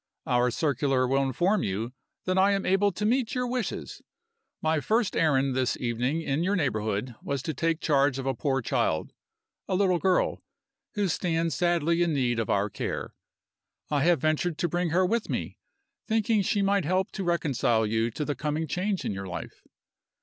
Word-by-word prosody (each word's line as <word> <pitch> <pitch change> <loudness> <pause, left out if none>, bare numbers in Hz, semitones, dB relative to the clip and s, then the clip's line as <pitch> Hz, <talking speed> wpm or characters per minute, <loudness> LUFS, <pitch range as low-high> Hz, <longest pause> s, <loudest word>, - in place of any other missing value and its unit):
Our 125 0 +2
circular 135 -1 +1
will 135 +2 +2
inform 175 +10 +1
you 110 +6 -3 0.3
that 185 - 0
I 195 +2 +4
am 195 - -1
able 195 +2 +3
to 210 +3 -3
meet 245 +2 +1
your 250 0 0
wishes. 245 -2 -4 0.6
My 160 0 +1
first 220 +6 +1
errand 140 -4 +2
this 130 -1 0
evening 125 +6 -1
in 140 +1 -1
your 195 +3 +1
neighborhood 110 - -1
was 140 -2 -3
to 160 - -2
take 165 +3 0
charge 140 -3 +2
of 135 - -4
a 135 - +1
poor 135 +1 -1
child 80 -7 0 0.5
a 185 - 0
little 185 -2 +2
girl 185 0 +1 0.5
who 205 -2 +1
stands 165 -1 0
sadly 170 -1 +1
in 170 -3 +2
need 120 -4 +1
of 115 - -2
our 100 +1 +2
care. - - -4 0.8
I 145 -2 +2
have 175 -3 +4
ventured 155 +1 0
to 175 - 0
bring 175 +1 -1
her 180 +3 +3
with 225 +4 -1
me, - - -4 0.5
thinking 220 -1 +2
she 200 +1 +1
might 200 -1 +2
help 185 +5 0
to 195 - -4
reconcile 135 -10 +1
you 110 +2 0
to 150 +6 -4
the 145 - -1
coming 150 +2 -2
change 185 +5 -2
in - - -1
your 95 0 -5
life. 90 - -7
160 Hz, 185 wpm, -27 LUFS, 130-185 Hz, 0.8 s, I